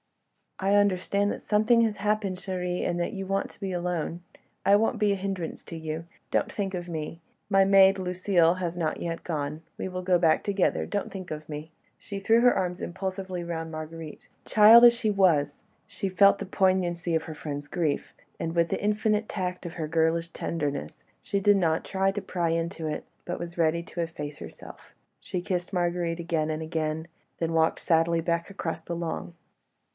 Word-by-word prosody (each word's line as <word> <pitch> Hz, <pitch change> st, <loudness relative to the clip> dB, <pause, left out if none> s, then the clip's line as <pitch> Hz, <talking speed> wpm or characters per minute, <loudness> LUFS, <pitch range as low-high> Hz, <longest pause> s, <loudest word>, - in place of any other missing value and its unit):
"I 195 Hz, +1 st, +1 dB
understand 200 Hz, 0 st, +2 dB
that -, -, -5 dB
something 220 Hz, +3 st, +3 dB
has 220 Hz, -2 st, +1 dB
happened, 205 Hz, -2 st, 0 dB
chérie, 180 Hz, -1 st, -2 dB
and 175 Hz, -, -1 dB
that 175 Hz, -, -1 dB
you 195 Hz, -2 st, -4 dB
want 195 Hz, +1 st, -1 dB
to -, -, -20 dB
be 195 Hz, -1 st, -3 dB
alone. 175 Hz, -1 st, -2 dB, 0.4 s
I 200 Hz, -, +6 dB
won't 225 Hz, +2 st, +1 dB
be 210 Hz, -2 st, +3 dB
a -, -, +2 dB
hindrance 190 Hz, -3 st, -4 dB
to -, -, -8 dB
you. 160 Hz, 0 st, -5 dB, 0.3 s
Don't -, -, +1 dB
think 195 Hz, -2 st, -3 dB
of 175 Hz, -1 st, -4 dB
me. 160 Hz, -1 st, -5 dB, 0.3 s
My 195 Hz, -1 st, +5 dB
maid, 195 Hz, 0 st, +6 dB
Lucile, 180 Hz, -2 st, +2 dB
has 175 Hz, -2 st, -3 dB
not 160 Hz, -3 st, -1 dB
yet 165 Hz, -1 st, -4 dB
gone... 150 Hz, -1 st, -3 dB, 0.2 s
we -, -, -3 dB
will 185 Hz, 0 st, -4 dB
go 180 Hz, -1 st, +4 dB
back 165 Hz, -2 st, +3 dB
together... 200 Hz, -2 st, +1 dB
don't 205 Hz, -, -3 dB
think 185 Hz, -3 st, -7 dB
of 155 Hz, 0 st, -6 dB
me." 150 Hz, +1 st, -6 dB, 0.3 s
She 200 Hz, -1 st, -7 dB
threw 225 Hz, +4 st, +4 dB
her 245 Hz, 0 st, +6 dB
arms 180 Hz, -1 st, -2 dB
impulsively 185 Hz, 0 st, -4 dB
round 165 Hz, -1 st, -4 dB
Marguerite. 155 Hz, 0 st, -8 dB, 0.2 s
Child 225 Hz, +3 st, +8 dB
as 240 Hz, -, +9 dB
she 230 Hz, -2 st, -1 dB
was, 160 Hz, -8 st, +2 dB, 0.2 s
she 195 Hz, -, -3 dB
felt 200 Hz, +2 st, +5 dB
the 200 Hz, -, -4 dB
poignancy 180 Hz, -3 st, +1 dB
of 160 Hz, -, +1 dB
her 160 Hz, -, -7 dB
friend's 145 Hz, -1 st, -5 dB
grief, 155 Hz, -3 st, -1 dB, 0.3 s
and 165 Hz, +1 st, -3 dB
with 170 Hz, -1 st, +3 dB
the -, -, -2 dB
infinite 210 Hz, +1 st, +1 dB
tact 180 Hz, -2 st, -3 dB
of 170 Hz, -, -8 dB
her 160 Hz, -3 st, -4 dB
girlish 165 Hz, +1 st, +1 dB
tenderness, 145 Hz, -4 st, -4 dB, 0.2 s
she 200 Hz, -, -1 dB
did 205 Hz, +1 st, +5 dB
not 165 Hz, -4 st, +1 dB
try 195 Hz, 0 st, +1 dB
to 205 Hz, +1 st, -4 dB
pry 175 Hz, -3 st, -1 dB
into 165 Hz, 0 st, -2 dB
it, 150 Hz, -, -3 dB, 0.2 s
but 175 Hz, -, -4 dB
was 170 Hz, 0 st, -7 dB
ready 165 Hz, 0 st, +2 dB
to 175 Hz, -, -5 dB
efface 150 Hz, -3 st, -5 dB
herself. -, -, -11 dB, 0.3 s
She 180 Hz, -2 st, -4 dB
kissed 180 Hz, +1 st, -3 dB
Marguerite 175 Hz, -1 st, 0 dB
again 165 Hz, -2 st, -1 dB
and 155 Hz, 0 st, -2 dB
again, 160 Hz, 0 st, -2 dB, 0.3 s
then 165 Hz, -1 st, -1 dB
walked 160 Hz, 0 st, +2 dB
sadly 165 Hz, 0 st, +2 dB
back 170 Hz, +1 st, -1 dB
across 185 Hz, -4 st, -4 dB
the 170 Hz, -, -5 dB
lawn. 170 Hz, 0 st, -4 dB
175 Hz, 190 wpm, -27 LUFS, 165-195 Hz, 0.4 s, as